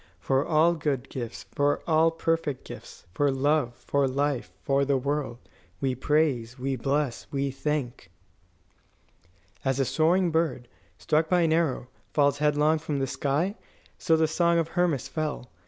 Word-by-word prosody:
"For 135 +9 +1
all 160 +2 +3
good 145 -5 -2
gifts, 120 -3 -6
for 145 0 +1
all 160 0 +4
perfect 165 -4 -2
gifts, - - -11
for 145 +6 +2
love, 135 -2 +1
for 140 +2 0
life, 140 -1 -1
for 140 0 +2
the 140 0 +2
world, 140 -2 -2 0.4
we 135 -1 0
praise, 130 -3 0
we 135 +1 -2
bless, 135 0 -1
we 140 -1 -1
thank 135 -2 -3 0.7
" 85 +3 -36
As 135 0 0
a 135 - +2
soaring 170 +5 +2
bird, 155 -7 0 0.3
struck 155 +1 +1
by 180 -1 +3
an 160 -1 +3
arrow, 160 -7 0 0.3
falls 145 -1 +3
headlong 150 +1 +2
from 155 -2 -3
the 135 - 0
sky, 145 +8 -1 0.5
so 160 - +3
the 160 0 +3
song 170 +2 +2
of 165 -1 0
Hermas 175 -7 0
fell. 155 -6 -4
145 Hz, 155 wpm, -27 LUFS, 135-160 Hz, 0.7 s, all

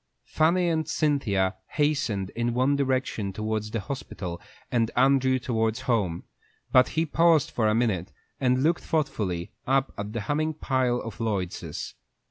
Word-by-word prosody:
Fanny 175 +3 +2
and 160 -2 0
Cynthia 105 -13 +1 0.2
hastened 145 -10 0
in 120 0 -1
one 130 +3 +3
direction 130 -7 -1
towards 110 +1 -2
the 110 0 -2
hospital, 95 -6 -6 0.3
and 115 -2 +2
Andrew 130 0 +4
towards 115 -2 -1
home; 105 -10 0 0.5
but 130 0 +6
he 160 - +3
paused 165 -1 +3
for 110 -3 +1
a 105 - +3
minute, 100 -6 0 0.3
and 130 0 +2
looked 165 +2 +2
thoughtfully 110 - -1 0.2
up 135 +1 +2
at 105 +1 -4
the 115 - -2
humming 155 +7 -1
pile 130 -4 +1
of 115 -2 -8
Lloyd's. 100 -6 -3
125 Hz, 145 wpm, -26 LUFS, 105-140 Hz, 0.5 s, but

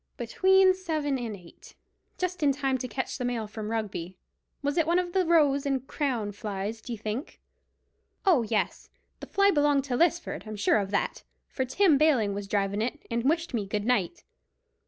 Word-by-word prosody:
"Between 375 +10 +4
seven 310 -7 -2
and 230 -3 -4
eight. 175 -3 -16 0.4
Just 365 -1 -3
in 290 -2 +4
time 270 -1 -1
to 255 - -3
catch 260 +2 -4
the - - -2
mail 245 -3 -1
from 215 0 -6
Rugby. 195 -5 -4 0.5
Was 285 +1 0
it 330 -2 +2
one 340 +1 +3
of 355 -1 -1
the 380 -1 +3
Rose 290 -5 +4
and 270 -2 -1
Crown 250 -9 -2
flies, 205 +1 -5
d'ye 235 0 -6
think?" 220 - -5 0.9
"Oh, 350 -10 +5
yes, 215 -4 -2 0.3
the - - -8
fly 400 0 +3
belonged 290 -4 +3
to 260 -3 -2
Lisford. 340 -4 0
I'm 215 - -5
sure 205 +1 +3
of 195 -1 -3
that, 200 - -1 0.3
for 260 - -2
Tim 310 +2 +3
Baling 255 -10 +3
was 200 0 -5
drivin' 200 0 0
it 255 +6 -3
and 235 +3 +1
wished 330 -1 -1
me 210 -4 -1
good 210 +1 -2
night." 215 -8 0
255 Hz, 185 wpm, -28 LUFS, 215-310 Hz, 0.9 s, Oh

